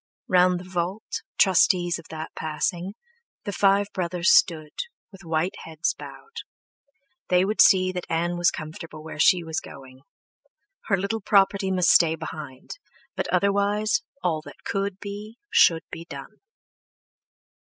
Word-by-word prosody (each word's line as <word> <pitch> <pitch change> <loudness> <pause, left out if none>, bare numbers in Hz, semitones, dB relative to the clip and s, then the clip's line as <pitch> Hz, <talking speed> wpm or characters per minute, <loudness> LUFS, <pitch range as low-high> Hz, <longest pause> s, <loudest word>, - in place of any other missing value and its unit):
Round 180 0 +4
the - - -9
vault, 185 +4 -3 0.2
trustees 180 -2 +3
of 165 - -14
that 160 0 -7
passing, 170 +5 -3 0.5
the 205 - -4
five 200 +1 +3
brothers 175 -1 +1
stood, 155 -4 +3 0.4
with 195 -1 -14
white 165 +3 -1
heads 160 0 -1
bowed; 455 +1 -12 0.9
they 180 +1 +4
would 215 +2 +2
see 185 -2 +5
that 180 -1 -6
Ann 170 +2 0
was 175 0 +3
comfortable 155 0 -8
where 160 -1 -9
she 175 +2 +5
was 160 -1 -3
going. 130 -1 -13 0.9
Her 195 - +2
little 200 +4 -2
property 195 -1 +3
must 185 -2 +3
stay 165 -2 +5
behind, 155 - -8 0.4
but - - -2
otherwise, 205 - +1 0.2
all 160 -3 0
that - - -14
could 195 -1 -2
be 205 +3 -8
should 170 - +5
be 165 - -7
done.... 170 +7 -10
180 Hz, 140 wpm, -25 LUFS, 165-200 Hz, 0.9 s, see